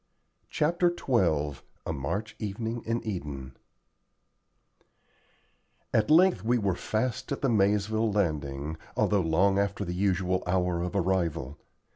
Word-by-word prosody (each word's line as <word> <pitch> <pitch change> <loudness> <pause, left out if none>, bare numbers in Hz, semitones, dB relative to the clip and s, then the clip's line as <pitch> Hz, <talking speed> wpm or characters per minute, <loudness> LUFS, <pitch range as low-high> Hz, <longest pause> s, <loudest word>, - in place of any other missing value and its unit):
CHAPTER 175 +3 +2
XII 80 - +1 0.2
A 80 - -2
MARCH 100 +11 -3
EVENING 110 +3 -3
IN 115 +1 -2
EDEN 70 -10 -5 2.4
At 110 -1 +2
length 160 - +5
we 120 +2 +2
were 100 -4 +1
fast 110 +8 -2
at 140 - -2
the 135 - +3
Maizeville 105 +1 +2
Landing, 75 -6 -1 0.2
although 100 -2 +3
long 95 +4 +3
after 100 0 -1
the 90 - -3
usual 95 -1 +1
hour 90 -1 +1
of 90 +1 -3
arrival. 85 -7 -1
95 Hz, 120 wpm, -28 LUFS, 85-110 Hz, 2.4 s, length